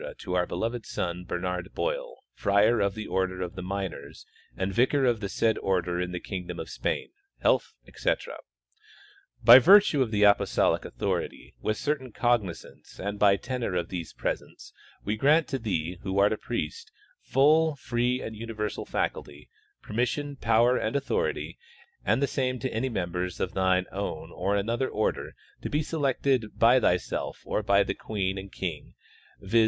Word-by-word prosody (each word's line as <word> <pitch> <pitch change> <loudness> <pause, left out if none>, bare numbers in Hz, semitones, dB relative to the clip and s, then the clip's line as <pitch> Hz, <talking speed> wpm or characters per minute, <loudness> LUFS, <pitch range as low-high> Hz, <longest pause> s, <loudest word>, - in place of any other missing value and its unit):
to 90 - -6
our 90 -1 +1
beloved 115 +6 -3
son, 90 0 -3
Bernard 90 0 -3
Boil, - - -3
friar 100 +3 +3
of 100 -1 +1
the 110 -1 -5
order 95 -1 -1
of 90 +2 -6
Minors 95 -6 -5 0.3
and 95 +1 -2
vicar 130 +4 +3
of 120 -3 +2
the 100 -2 -4
said 110 +1 +1
order 90 -2 0
in 90 0 -3
the 90 - -3
kingdom 90 -2 -6
of - - -6
Spain, - - -2 0.3
health, - - +2
etc.: - - -2 1.1
By 120 +3 +11
virtue 185 -1 +6
of 120 -4 0
apostolic 105 -1 +3
authority, - - -3
with 110 0 -1
certain 145 -4 -2
cognizance 115 -7 -2
and 100 +1 -4
by 100 -1 +6
tenor 125 -3 -3
of 85 -1 -1
these 85 -3 -5
presents, - - -5 0.3
we 105 +2 -1
grant 150 +6 +4
to 135 - -2
thee, 90 -6 -2
who 95 0 -3
art 100 +2 +4
a - - -3
priest, 105 -12 -4 0.3
full, 155 +3 +3
free 125 -1 -1
and 110 - -6
universal 110 -1 -4
faculty, 70 +1 -3 0.3
permission 135 +6 -2
power, 115 0 +3
and - - -2
authority, 140 -1 -1 0.4
and 135 - +2
the - - +5
same 130 -2 -1
to 130 +1 -4
any 120 +4 -1
members 90 -4 -3
of 95 - -2
thy 95 -1 +2
own 100 +1 -4
or 95 +3 -1
another 115 +6 0
order, 110 - -2 0.3
to* - - -4
be 150 +1 0
selected 135 -6 0
by 120 +3 +6
thyself 90 -6 -1
or - - -1
by 100 -1 +4
the - - -2
King 95 -2 -3
and 95 0 -10
Queen, - - -5 0.4
viz. 100 +4 +2
105 Hz, 160 wpm, -27 LUFS, 95-125 Hz, 1.1 s, By